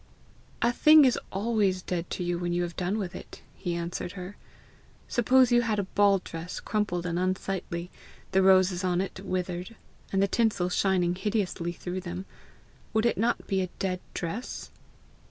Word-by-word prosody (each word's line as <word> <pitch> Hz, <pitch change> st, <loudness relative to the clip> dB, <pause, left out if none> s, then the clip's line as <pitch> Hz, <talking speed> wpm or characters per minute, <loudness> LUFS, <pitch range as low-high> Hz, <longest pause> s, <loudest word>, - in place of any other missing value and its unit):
A 235 Hz, -, +4 dB
thing 305 Hz, +2 st, +7 dB
is 255 Hz, -, +3 dB
always 200 Hz, -3 st, +1 dB
dead 175 Hz, -1 st, -3 dB
to 180 Hz, -, -3 dB
you 175 Hz, 0 st, -1 dB
when 175 Hz, -1 st, -1 dB
you 175 Hz, 0 st, +1 dB
have 175 Hz, -1 st, -5 dB
done 185 Hz, +3 st, -1 dB
with 190 Hz, -5 st, -3 dB
it," -, -, -10 dB
he 175 Hz, -3 st, -3 dB
answered 170 Hz, +1 st, -4 dB
her. 185 Hz, +1 st, -7 dB, 0.7 s
"Suppose 255 Hz, +1 st, +4 dB
you 240 Hz, 0 st, +5 dB
had 225 Hz, -3 st, 0 dB
a 200 Hz, -, +1 dB
ball 200 Hz, +1 st, +3 dB
dress 165 Hz, +2 st, -6 dB
crumpled 205 Hz, -5 st, -1 dB
and 175 Hz, 0 st, -1 dB
unsightly 185 Hz, -1 st, -2 dB, 0.4 s
the 190 Hz, 0 st, +4 dB
roses 185 Hz, -1 st, +4 dB
on 180 Hz, -1 st, +1 dB
it 190 Hz, 0 st, -3 dB
withered, 180 Hz, +2 st, -3 dB, 0.4 s
and 195 Hz, -, +1 dB
the 200 Hz, -, +4 dB
tinsel 210 Hz, -5 st, +1 dB
shining 180 Hz, -2 st, +2 dB
hideously 185 Hz, -3 st, -1 dB
through 180 Hz, +2 st, -5 dB
them 180 Hz, +1 st, -6 dB, 0.7 s
would 220 Hz, +1 st, +2 dB
it 235 Hz, -, +3 dB
not 235 Hz, +3 st, +1 dB
be 190 Hz, -1 st, 0 dB
a 185 Hz, -, -2 dB
dead 185 Hz, -2 st, -1 dB, 0.2 s
dress?" 190 Hz, +9 st, -5 dB
185 Hz, 170 wpm, -28 LUFS, 175-210 Hz, 0.7 s, thing